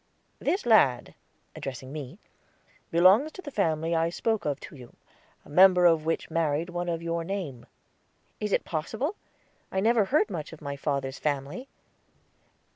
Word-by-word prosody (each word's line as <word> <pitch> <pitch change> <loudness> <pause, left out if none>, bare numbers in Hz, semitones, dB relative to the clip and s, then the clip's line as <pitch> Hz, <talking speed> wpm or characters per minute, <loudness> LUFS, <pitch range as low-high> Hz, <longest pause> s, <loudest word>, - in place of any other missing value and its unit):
"This 380 - -1
lad," 140 - +4 0.4
addressing 130 0 -7
me, 150 +1 -7 0.7
"belongs 190 - +5
to 375 - -9
the 290 - -7
family 165 - 0
I 165 0 +2
spoke 220 +5 -1
of 145 -2 -1
to - - -10
you, 125 -3 -13 0.5
a - - -15
member 180 +2 +6
of 165 -3 +4
which 165 - -2
married 160 +1 0
one 175 0 -3
of 165 0 -3
your 170 0 -2
name." 165 -9 -5 0.7
"Is 210 -1 -3
it - - +1
possible? 220 - -3 0.6
I 190 - 0
never 220 +1 +3
heard 225 -2 +2
much 165 -3 -5
of 160 - -11
my 140 -2 -5
father's 140 -2 -3
family." 145 - -3
165 Hz, 155 wpm, -27 LUFS, 145-200 Hz, 0.7 s, member